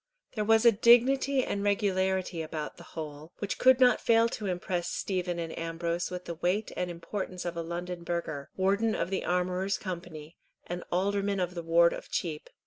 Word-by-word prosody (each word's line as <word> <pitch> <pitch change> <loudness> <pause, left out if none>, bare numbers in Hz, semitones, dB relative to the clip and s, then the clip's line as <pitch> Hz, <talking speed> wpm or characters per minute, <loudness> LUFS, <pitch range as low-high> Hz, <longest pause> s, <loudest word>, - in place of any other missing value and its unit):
There 215 - -1
was 225 +2 +4
a 235 - +9
dignity 255 +5 +4
and 200 - -2
regularity 190 -3 0
about 155 -1 -5
the 175 - -11
whole, 155 +1 -7
which 205 - -3
could 260 0 +6
not 250 -1 +5
fail 230 0 +4
to 215 -3 -4
impress 180 -1 -2
Stephen 180 -2 -2
and 165 -1 -4
Ambrose 170 +1 -2
with 180 0 -6
the 170 - -4
weight 180 +6 -1
and 180 0 -2
importance 180 +1 -5
of 175 -1 -3
a 170 - -2
London 175 +1 -5
burgher, 165 -5 -3
warden 200 +4 +2
of 170 - -2
the 190 - -1
Armourers' 180 +2 0
Company, 170 -4 -7 0.3
and 175 0 -5
alderman 200 +2 0
of 180 -1 -1
the 170 - -4
Ward 170 +1 +4
of - - -8
Cheap. 155 -4 -3
180 Hz, 185 wpm, -29 LUFS, 170-200 Hz, 0.3 s, a